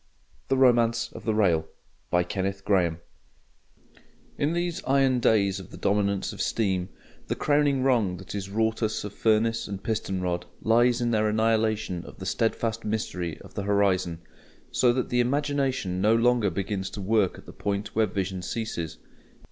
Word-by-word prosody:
The 135 - +1
Romance 120 -3 +3
of - - -10
the 110 -2 +1
Rail 85 -7 +2 0.4
In 95 -1 +1 1.6
these 175 -1 -2
iron 135 -2 +3
days 100 -4 +2
of 95 - -11
the - - -11
dominance 100 -1 0
of - - -6
steam, 95 -5 0 0.4
the - - -1
crowning 145 -2 +2
wrong 115 -9 +2
that 95 +1 -9
is 100 -1 -4
wrought 110 +3 0
us 110 -1 -1
of 105 -1 -6
furnace 115 +1 +1
and 95 -2 -6
piston 100 -3 -2
rod 90 -1 -2
lies 120 +2 +3
in 120 0 +1
their 110 -1 +2
annihilation 110 -4 +1
of - - -12
the 95 - -8
steadfast 115 +2 -1
mystery 90 -6 -3
of - - -14
the - - -3
horizon, 95 -4 +1 0.5
so 125 - +4
that 125 +1 -1
the 125 - +1
imagination 130 -7 0
no 110 +3 +4
longer 120 -2 +3
begins 95 +1 -3
to 105 - -8
work 100 -1 +1
at - - -14
the - - -11
point 100 +1 -3
where 110 0 +3
vision 95 -1 -3
ceases. 90 -5 -4
105 Hz, 160 wpm, -26 LUFS, 95-115 Hz, 1.6 s, so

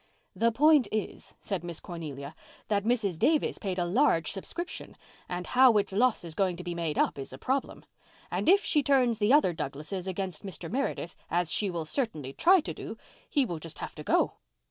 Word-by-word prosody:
"The 230 0 +2
point 295 0 +5
is," 215 -1 -4
said 190 -4 -3
Miss 170 -2 -6
Cornelia, 150 -4 -7 0.4
"that 205 -2 +1
Mrs. 215 -8 0
Davis 310 -1 +2
paid 190 -3 -3
a 175 - +1
large 175 - +2
subscription, 340 - -5 0.3
and 180 0 -3
how 255 -3 +5
its 200 - +1
loss 240 +1 +2
is 165 -2 -5
going 185 +1 +1
to 180 - -8
be 175 -1 -4
made 165 -3 -2
up - - +1
is 135 - -6
a 130 - -8
problem. 265 - -2 0.5
And - - 0
if 400 +2 +5
she 300 - +3
turns 255 -5 +3
the 210 +2 +3
other 280 - +5
Douglases 160 +5 -5
against 190 -2 -3
Mr. 180 -3 -6
Meredith, 250 -9 -2
as 175 -1 0
she 205 - +1
will 170 -3 -3
certainly 155 - -2
try 365 - +5
to - - -5
do, - - -7 0.3
he 285 -4 +2
will 170 -8 -4
just 165 0 -8
have - - -6
to - - -9
go." - - +2
195 Hz, 200 wpm, -29 LUFS, 170-255 Hz, 0.5 s, point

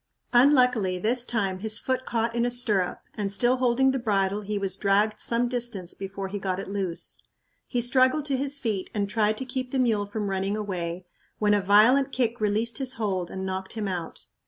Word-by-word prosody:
Unluckily, 250 -7 +4
this 240 +6 +1
time 195 -5 -1
his 220 +2 +3
foot 260 0 -2
caught 230 0 -1
in 235 0 0
a 245 - +1
stirrup 215 -7 +1
and, 200 -2 -3
still 240 +5 +2
holding 255 +1 +3
the 265 - -2
bridle, 200 -3 0
he 210 0 -3
was 195 -2 -1
dragged 210 +2 +1
some 235 +1 +1
distance 235 -7 -3
before 195 0 -6
he 200 +2 -5
got 190 -1 -2
it - - -6
loose. 190 -4 -1 0.5
He 245 - -1
struggled 260 +4 +3
to 280 -2 -1
his 280 +2 -1
feet 220 -8 -3
and 200 -1 0
tried 215 +1 +1
to 265 - -4
keep 255 0 -4
the 270 - -2
mule 220 -5 +1
from 205 -1 -3
running 195 +2 -1
away, 180 -4 -4 0.3
when 210 -1 +2
a 205 - +3
violent 225 +8 +5
kick 240 -3 -1
released 215 +2 0
his 265 -1 0
hold 195 -7 -2
and 190 0 -5
knocked 190 0 -4
him 215 -3 -3
out. 175 -3 -5
215 Hz, 205 wpm, -26 LUFS, 195-245 Hz, 0.5 s, violent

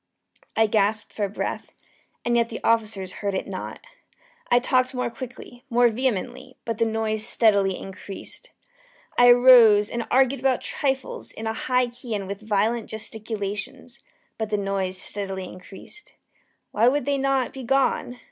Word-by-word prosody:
I 225 - +5
gasped 210 0 0
for 205 -2 -2
breath 205 - -4 0.5
and 240 0 +2
yet 235 -1 +2
the 230 - -6
officers 215 -5 0
heard 200 -2 -1
it - - -2
not. - - -6 0.7
I 240 - +5
talked 255 +1 +1
more 250 -1 -1
quickly 245 0 -10
more 245 0 +4
vehemently; 255 +2 -3
but 230 -2 -3
the 230 - +3
noise 220 -1 -1
steadily 200 -5 +3
increased. 195 - -9 0.7
I 245 0 +7
arose 240 -4 +7
and 235 -1 -3
argued 265 +1 +3
about 260 -1 +1
trifles, 265 -2 -2
in 220 - -8
a 220 - -1
high 250 +2 +1
key 240 -1 -6
and 200 -2 -3
with 200 +2 -6
violent 220 +2 0
gesticulations; 220 +2 -5 0.4
but 220 -1 -2
the 210 - 0
noise 195 -2 -2
steadily 195 -1 -4
increased. 195 - -11 0.6
Why 225 +3 +3
would 285 +3 +2
they 280 -1 0
not 270 -2 0
be 265 - -7
gone? 260 -1 0
225 Hz, 155 wpm, -24 LUFS, 205-250 Hz, 0.7 s, I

